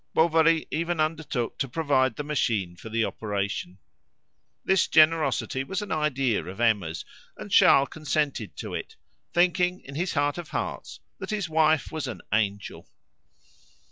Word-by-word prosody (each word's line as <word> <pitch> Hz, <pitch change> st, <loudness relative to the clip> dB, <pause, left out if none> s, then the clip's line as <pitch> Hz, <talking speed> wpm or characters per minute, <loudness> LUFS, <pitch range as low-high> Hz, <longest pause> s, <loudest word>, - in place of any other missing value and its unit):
Bovary 165 Hz, 0 st, +4 dB
even 170 Hz, +1 st, -1 dB
undertook 155 Hz, -6 st, -2 dB
to 135 Hz, -, -1 dB
provide 130 Hz, -4 st, +1 dB
the 145 Hz, -, -4 dB
machine 115 Hz, -11 st, -1 dB
for 110 Hz, -, -10 dB
the 115 Hz, 0 st, +1 dB
operation. 100 Hz, -3 st, -3 dB, 0.9 s
This 190 Hz, -1 st, +3 dB
generosity 155 Hz, -5 st, +3 dB
was 195 Hz, +7 st, -3 dB
an 205 Hz, -, -8 dB
idea 135 Hz, -, 0 dB
of 90 Hz, +5 st, -9 dB
Emma's, 100 Hz, -9 st, +1 dB, 0.3 s
and -, -, -9 dB
Charles 140 Hz, 0 st, +6 dB
consented 145 Hz, -7 st, -2 dB
to -, -, -6 dB
it, -, -, -6 dB, 0.4 s
thinking 180 Hz, +1 st, +2 dB
in 140 Hz, -, -11 dB
his 175 Hz, +5 st, -2 dB
heart 145 Hz, +3 st, +1 dB
of 170 Hz, -2 st, -8 dB
hearts -, -, -5 dB, 0.2 s
that -, -, -6 dB
his 210 Hz, -5 st, -2 dB
wife 155 Hz, -1 st, +2 dB
was 155 Hz, -4 st, -4 dB
an 110 Hz, -8 st, -7 dB
angel. 100 Hz, -2 st, -2 dB
145 Hz, 145 wpm, -26 LUFS, 115-160 Hz, 0.9 s, Charles